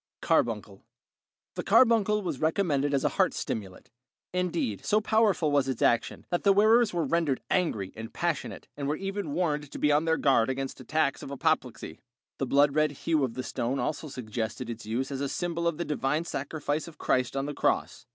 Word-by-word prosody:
Carbuncle - - 0 0.7
The - - -3
carbuncle 215 -4 +4
was 160 -8 -3
recommended 155 -4 +1
as 140 -2 +1
a - - +3
heart - - +3
stimulant; 95 -4 -5 0.4
indeed, 170 - -1
so 210 - +3
powerful 215 -8 +2
was 140 -2 +2
its 130 -3 -2
action, 120 - +1
that 175 - +1
the 200 - +5
wearers 220 +3 +5
were 170 -2 -1
rendered 165 -6 +1
angry 110 - 0
and 115 +1 -7
passionate 170 -3 -3
and 140 -1 -4
were 150 - 0
even 195 -4 -4
warned 150 -4 -1
to - - -7
be 150 - +2
on 150 +2 +3
their 160 0 +2
guard 130 -5 +3
against 135 +1 -3
attacks 140 +2 0
of 140 - -8
apoplexy. 130 - -1 0.4
The 135 - -1
blood 140 +2 +4
red 155 0 +2
hue 160 -3 +2
of 120 -3 -2
the 130 - -3
stone 125 +3 -2
also 155 +2 -2
suggested 120 -1 -4
its 115 -2 -8
use 125 +5 -2
as 135 0 -3
a 140 - -1
symbol 170 +1 -2
of 170 -3 0
the 170 - -2
divine 150 +2 -1
sacrifice 150 +1 -3
of 160 -3 -12
Christ 130 -2 0
on 135 - -1
the 145 - -4
cross. - - -1
145 Hz, 195 wpm, -28 LUFS, 130-170 Hz, 0.7 s, the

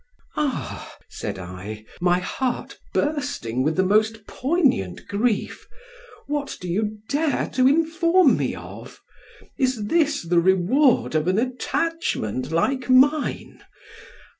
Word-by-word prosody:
"Ah!" 295 -4 -3
said - - -5
I, 95 +4 -8 0.2
my 175 0 +3
heart 245 +7 -3
bursting 285 - -1
with 155 +4 +1
the 190 - +3
most 215 +2 +1
poignant 260 - 0
grief, 215 +2 -1 0.6
"what 285 -1 -3
do 180 - -7
you 210 +4 -1
dare 295 +1 0
to 255 0 +3
inform 330 +4 +4
me - - -2
of? - - -11 0.6
Is 255 -6 0
this 305 - +2
the 170 +1 +2
reward 190 - +3
of 155 +1 0
an 185 +2 +2
attachment 250 - -2
like 260 +11 0
mine? 280 +4 +2
245 Hz, 115 wpm, -23 LUFS, 175-290 Hz, 0.6 s, inform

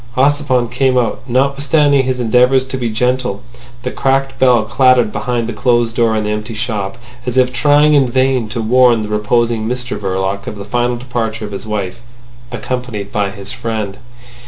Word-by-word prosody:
Ossipon 135 -2 +2
came 130 0 +1
out. 120 -2 0
Notwithstanding 140 +2 +2
his 130 -1 -1
endeavours 125 +3 +3
to 130 - -5
be 120 -2 -2
gentle, 125 -2 -1 0.4
the 125 - -3
cracked 135 0 0
bell 125 -4 +4
clattered 125 0 +3
behind 120 -3 -2
the 120 - -4
closed 120 +1 +1
door 115 -2 +2
in 110 - 0
the 105 - -2
empty 105 +2 -4
shop, 105 -3 -3 0.3
as 125 +1 -2
if 125 0 +3
trying 145 +3 +4
in 135 -4 +4
vain 130 -2 +1
to 115 +1 -3
warn 120 -1 +4
the 105 - -6
reposing 110 +1 0
Mr 125 0 -3
Verloc 95 0 -2
of - - -5
the 100 -1 -8
final 120 +2 -1
departure 115 -3 -3
of 105 - -8
his 100 +2 -7
wife—accompanied 120 +1 -6
by 100 -1 0
his 100 0 -9
friend. 110 -5 -4
120 Hz, 175 wpm, -16 LUFS, 110-130 Hz, 0.4 s, bell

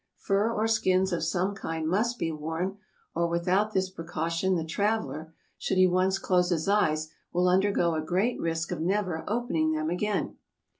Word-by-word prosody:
Fur 200 +3 +1
or 220 -1 0
skins 190 -4 +2
of 170 - -1
some 190 +2 0
kind 160 -4 -4
must 225 +8 +1
be 165 - -1
worn, 160 +6 -3 0.3
or 170 +1 +1
without 180 +5 +1
this 190 -2 0
precaution 165 +1 -1
the 165 -2 -1
traveler, 185 -3 -1 0.3
should 190 - -1
he 185 - +7
once 185 +1 +2
close 180 -2 +2
his 165 -2 0
eyes, 155 -7 +2 0.2
will 180 +1 +2
undergo 185 -2 +3
a 155 - -1
great 185 +9 0
risk 165 0 -2
of - - -3
never 180 -2 0
opening 195 -9 0
them 155 +1 -1
again. 205 +3 -1
180 Hz, 170 wpm, -28 LUFS, 165-200 Hz, 0.3 s, he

